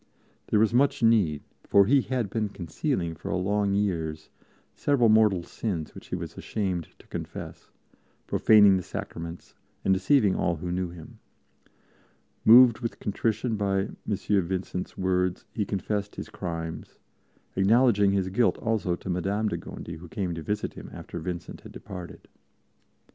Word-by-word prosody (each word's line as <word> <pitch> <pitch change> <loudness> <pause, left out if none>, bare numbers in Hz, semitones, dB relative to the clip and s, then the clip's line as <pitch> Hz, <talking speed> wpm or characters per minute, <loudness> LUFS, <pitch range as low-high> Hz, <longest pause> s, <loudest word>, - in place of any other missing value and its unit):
There 105 - +2
was 110 +1 +3
much 130 0 +2
need, 100 -11 +3 0.2
for 100 -1 +5
he 135 +6 +4
had 120 -6 -2
been 110 -2 -1
concealing 90 - -2
for - - -7
long 100 +2 +1
years 80 -6 -2 0.4
several 130 -6 +2
mortal 105 -5 +4
sins 85 -5 -4
which - - -12
he - - -3
was - - -6
ashamed 95 -6 -3
to - - -19
confess, - - -7 0.6
profaning 105 -3 +6
the - - -2
Sacraments 85 0 -7 0.3
and 95 - +4
deceiving 105 0 +3
all 85 - 0
who 90 +3 -5
knew 90 0 -1
him. 85 -2 -12 1.2
Moved 120 0 +8
with 115 -2 -4
contrition 110 +2 -1
by 100 -1 +1
M. 95 - -6
Vincent's 95 -3 -1
words, 90 -1 0
he 105 - -1
confessed 100 +1 -3
his - - -7
crimes, 85 -3 -6 0.6
acknowledging 105 +1 +4
his 95 -1 0
guilt 115 +6 +2
also 110 -6 0
to 85 - -12
Madame 100 +4 0
de - - -2
Gondi, 85 - -8
who 90 +2 -11
came 90 -2 -2
to 80 - -5
visit 105 +6 -3
him - - -10
after - - -7
Vincent 90 -2 -6
had - - -12
departed. 90 -2 -9
100 Hz, 150 wpm, -27 LUFS, 90-110 Hz, 1.2 s, Moved